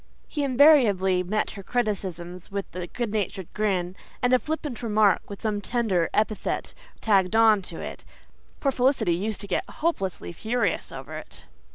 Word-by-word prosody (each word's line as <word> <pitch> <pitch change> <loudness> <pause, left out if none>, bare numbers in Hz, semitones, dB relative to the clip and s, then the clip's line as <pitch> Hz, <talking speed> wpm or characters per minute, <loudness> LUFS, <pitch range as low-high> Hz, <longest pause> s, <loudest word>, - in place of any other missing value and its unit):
He 295 - -2
invariably 245 -10 +5
met 210 +4 -1
her 200 - -8
criticisms 185 -6 -3
with 200 -2 -5
a 180 -1 -4
good 235 +3 -3
natured 195 -3 -3
grin 190 -4 0 0.3
and 245 +1 +3
a 255 - +6
flippant 300 -5 -4
remark 215 -4 +2
with 200 - -8
some 210 -2 -1
tender 200 -7 0
epithet 215 0 -1 0.3
tagged 195 -2 +3
on 220 -2 +6
to 175 -3 -8
it. - - -7 0.6
Poor 275 - +1
Felicity 255 -8 +2
used 205 +5 -2
to 200 - -7
get - - -1
hopelessly 195 - -2
furious 225 +5 -1
over 135 +4 -7
it. 155 - -11
210 Hz, 160 wpm, -26 LUFS, 185-240 Hz, 0.6 s, a